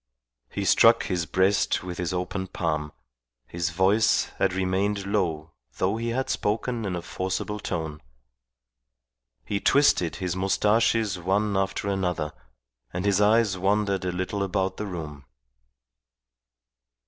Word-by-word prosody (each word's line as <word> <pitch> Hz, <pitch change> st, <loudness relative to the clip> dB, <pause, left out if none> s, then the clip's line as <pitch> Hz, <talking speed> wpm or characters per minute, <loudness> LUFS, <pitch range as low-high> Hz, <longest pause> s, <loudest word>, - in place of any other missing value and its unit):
He -, -, -3 dB
struck -, -, +5 dB
his 85 Hz, -2 st, -2 dB
breast 95 Hz, 0 st, +2 dB
with 90 Hz, -1 st, -6 dB
his 90 Hz, -1 st, -1 dB
open 90 Hz, +1 st, -3 dB
palm; 75 Hz, -4 st, -2 dB, 0.5 s
his 85 Hz, +4 st, -2 dB
voice 95 Hz, +6 st, +2 dB
had 95 Hz, -, +2 dB
remained 95 Hz, +2 st, 0 dB
low 85 Hz, -6 st, -1 dB, 0.3 s
though 95 Hz, +4 st, +1 dB
he 115 Hz, +1 st, -3 dB
had 130 Hz, +3 st, -1 dB
spoken 115 Hz, +2 st, -1 dB
in 95 Hz, -3 st, -2 dB
a 85 Hz, -, -5 dB
forcible 95 Hz, +4 st, -3 dB
tone. 80 Hz, -6 st, -4 dB, 1.4 s
He 100 Hz, -, -1 dB
twisted 120 Hz, -, +3 dB
his 90 Hz, -1 st, -3 dB
moustaches 105 Hz, +1 st, +2 dB
one 100 Hz, +3 st, 0 dB
after 95 Hz, +1 st, -1 dB
another, 90 Hz, -6 st, -1 dB, 0.6 s
and 90 Hz, +2 st, -3 dB
his 100 Hz, 0 st, +3 dB
eyes 105 Hz, -2 st, +3 dB
wandered 100 Hz, 0 st, +1 dB
a 90 Hz, -, -1 dB
little 95 Hz, +3 st, -3 dB
about 95 Hz, 0 st, -1 dB
the 105 Hz, -, -4 dB
room. 75 Hz, -6 st, -7 dB
95 Hz, 130 wpm, -26 LUFS, 90-105 Hz, 1.4 s, struck